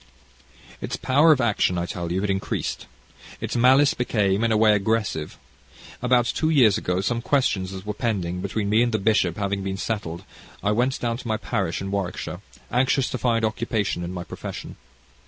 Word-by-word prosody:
"Its - - -3
power 145 +5 +4
of 150 - +4
action, 105 -6 +1
I 85 - -1
tell 85 -1 -4
you, 95 +2 0
had 105 - -1
increased. 95 0 -3 0.5
Its - - -4
malice 130 +4 +5
became, 105 -4 +1
in 115 - +2
a 110 - +3
way, 110 0 +5
aggressive. 105 -6 -1 0.6
About 125 -1 +3
two 155 +6 0
years 125 - +5
ago, 90 +1 -1
some 115 +4 -1
questions 115 -9 +1
that 95 0 -8
were 105 - -3
pending 95 -6 -2
between 100 +1 -2
me 110 +3 +3
and 120 0 +2
the - - +3
bishop 95 -5 +1
having 100 -1 -1
been 95 0 -3
settled, 95 -6 -4 0.4
I 105 - +2
went 125 +5 +1
down 115 -1 -1
to 125 - -9
my 110 -1 0
parish 95 -9 -2
in 95 0 -4
Warwickshire, 95 -2 -3 0.3
anxious 130 +1 +2
to 130 - -3
find 115 -2 +1
occupation 110 -4 -1
in 85 - -4
my 90 -1 -5
profession. - - -7
105 Hz, 190 wpm, -24 LUFS, 95-120 Hz, 0.6 s, malice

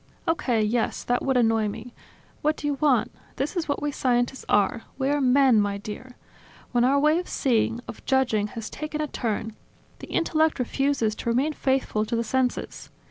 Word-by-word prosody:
"Okay, 245 -9 +1
yes; 225 +2 0
that 245 0 0
would 265 -2 +1
annoy 225 -2 +3
me. 225 +4 -7 0.5
What 305 +1 +1
do - - -7
you 290 - +1
want? 265 -7 +3 0.2
This 275 +7 -2
is 335 -4 -2
what 285 - -1
we 295 - 0
scientists 245 -1 0
are: 205 +3 +2 0.2
we 270 0 0
are 290 0 +1
men, 255 -3 +5
my 200 -1 -1
dear. 215 +5 -8 0.6
When 240 -1 +2
our 275 +3 +4
way 305 +3 +3
of 360 - -6
seeing, 235 -2 +1
of - - -9
judging, 245 -6 +2
has 225 - -4
taken 305 0 -5
a 305 - 0
turn, 225 -5 -3 0.4
the - - -9
intellect 315 -2 +1
refuses 260 -3 0
to - - -3
remain 265 +7 +1
faithful 265 -7 0
to 230 +2 -2
the 230 - 0
senses. 250 +2 -2
250 Hz, 190 wpm, -25 LUFS, 225-285 Hz, 0.6 s, men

